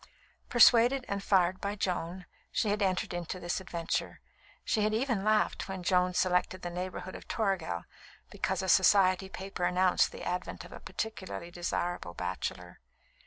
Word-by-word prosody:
Persuaded 245 +2 +6
and 200 0 -2
fired 185 -2 +2
by 200 +1 -2
Joan, 180 -2 -3 0.3
she 215 - 0
had 205 +1 0
entered 185 -2 0
into 175 +1 -4
this 175 +1 -2
adventure. 170 -3 -3 0.5
She 215 - +1
had 215 +1 +2
even 235 -4 0
laughed 215 -1 +1
when 190 -1 -5
Joan 180 0 +2
selected 185 0 +1
the 175 - -4
neighbourhood 185 +1 -5
of - - -10
Toragel 190 - -1 0.5
because - - -1
a - - -3
Society 190 0 +4
paper 190 -1 -6
announced 180 +1 +3
the - - -9
advent 180 +1 -4
of - - -13
a - - -9
particularly 190 -5 -5
desirable 175 - -3
bachelor. 90 -1 -4
185 Hz, 155 wpm, -31 LUFS, 175-200 Hz, 0.5 s, Persuaded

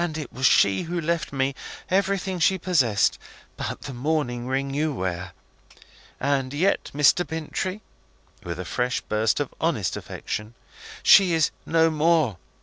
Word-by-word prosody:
it 150 -5 -6
was 130 +1 +2
she 95 -1 +4
who 175 +1 -3
left 165 -1 -1
me 135 0 0 0.4
everything 190 -1 0
she 190 +4 +3
possessed, 135 - +2 0.4
but - - -5
the 140 - -7
mourning 125 -2 -1
ring 135 +1 -1
you 155 +2 0
wear. 95 -6 -4 0.9
And 135 -1 0
yet, 185 +7 +1
Mr. 150 +5 +4
Bintrey," 165 +5 -4 0.6
with 85 -1 -6
a 90 - -4
fresh 125 +7 -1
burst 110 +4 0
of 145 - -3
honest 150 - 0
affection, 105 +2 -6 0.5
"she 190 -4 +7
is 160 -1 +2 0.2
no 165 0 +3
more. 155 - +2
145 Hz, 145 wpm, -24 LUFS, 120-165 Hz, 0.9 s, she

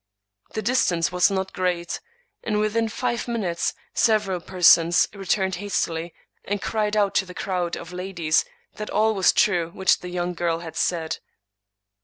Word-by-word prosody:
The 215 - -2
distance 175 - +2
was 180 +2 +4
not 190 -1 -2
great; 175 -2 -1 0.4
and 210 -2 0
within 220 +2 +1
five 240 +2 -2
minutes 195 -8 -1 0.2
several 210 -5 +2
persons 170 -1 +5
returned 190 -1 -1
hastily, 170 -4 -2 0.3
and 205 +1 -2
cried 215 +1 -1
out 200 -2 +2
to 195 - +2
the 180 - -10
crowd 180 -3 -2
of 170 +1 -9
ladies 180 -4 0 0.3
that 210 - -5
all 220 +1 +2
was 190 -3 +4
true 175 -5 +2
which 190 +2 +2
the 180 - -7
young 180 0 -2
girl 170 -1 -1
had 160 -2 -8
said. 165 -2 -1
185 Hz, 155 wpm, -24 LUFS, 170-210 Hz, 0.4 s, persons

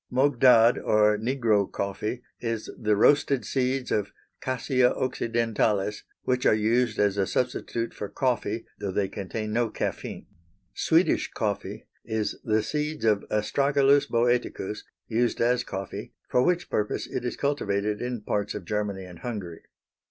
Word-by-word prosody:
Mogdad 125 -3 +5
or 105 0 +3
Negro 110 -3 +1
coffee 105 +5 -3 0.2
is 115 -2 -3
the 105 -1 +1
roasted 140 +4 +3
seeds 130 -1 -1
of 105 -1 0 0.3
Cassia 130 0 +2
occidentalis, 115 -4 0 0.2
which 125 0 0
are - - +5
used 115 +1 +1
as 100 -1 +2
a 95 -1 +1
substitute 120 -1 -2
for 105 - -6
coffee, 115 -1 -1
though 100 -2 -3
they 95 +1 0
contain 105 +2 -5
no 120 0 +1
caffeine. - - -4 0.5
Swedish 165 +3 +2
coffee 105 -4 -3 0.2
is 110 -1 -2
the 110 -1 +1
seeds 150 +1 -2
of 105 -2 +3
Astragalus 140 +6 +3
Boeticus 120 -4 0 0.3
used 120 +1 0
as 120 +1 +2
coffee, 95 -4 -6
for 125 - +2
which 175 +6 +1
purpose 105 0 -1
it - - -4
is 120 - -3
cultivated 105 -8 -1
in 120 -2 -3
parts 105 0 -2
of 95 - -6
Germany 105 -1 -2
and 90 -2 -12
Hungary. 100 -9 -6
115 Hz, 140 wpm, -26 LUFS, 105-125 Hz, 0.5 s, Mogdad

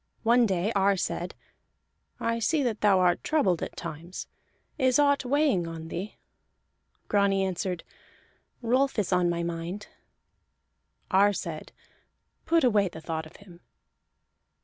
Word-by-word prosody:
One 235 +1 +4
day 190 +2 0
Ar 195 0 +3
said: 175 0 -3 0.8
"I 230 0 -1
see 295 +6 +1
that 230 -4 -2
thou 205 -2 +5
art 175 -1 +2
troubled 200 - +1
at - - -5
times. 170 +2 -7 0.5
Is 260 -2 +4
aught 285 -2 +3
weighing 270 - +2
on 165 -1 -7
thee?" 195 +6 -5 0.9
Grani 200 -1 +2
answered: 185 -1 -2 0.8
"Rolf 255 +3 +2
is 200 -3 0
on 180 -1 +3
my 170 0 -1
mind." 170 +4 -5 1.2
Ar 200 +2 +5
said: 165 -5 -6 0.8
"Put 330 0 +3
away 210 -5 +4
the 160 - -10
thought 160 0 -4
of - - -19
him." 180 -4 -15
195 Hz, 130 wpm, -27 LUFS, 175-230 Hz, 1.2 s, thou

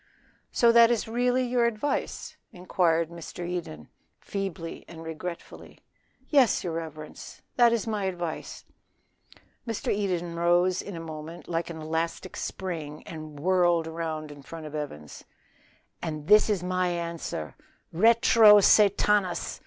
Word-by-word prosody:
"So 235 -1 +4
that 230 0 +7
is 235 -2 0
really 245 +2 +1
your 245 -1 +1
advice?" 235 +5 -3 0.2
inquired 170 -3 0
Mr. 170 +1 -7
Eden, 165 - -5 0.3
feebly 190 -4 -5
and 165 -1 -10
regretfully. 165 +2 -8 0.5
"Yes, 270 -7 +3
your 170 - -3
reverence, 155 -2 -8
that 240 -1 +5
is 230 -2 0
my 210 -3 -2
advice." 175 -4 -5 1.0
Mr. 225 -2 -1
Eden 180 -4 -2
rose 175 +2 +2
in 200 - -8
a - - -6
moment 160 +1 -8
like 170 0 -2
an 165 -1 -7
elastic 160 +1 -3
spring, 160 -5 -5
and 155 -3 -9
whirled 175 0 +2
round 160 -2 -5
in 145 -1 -12
front 160 +3 -9
of 150 - -8
Evans. 75 - -7 0.8
"And 155 -3 -5
this 210 +5 +6
is 200 -4 0
my 185 0 0
answer 170 - -4 0.4
RETRO 220 +2 +6
SATANAS!" 200 -3 +3
175 Hz, 130 wpm, -27 LUFS, 160-205 Hz, 1.0 s, that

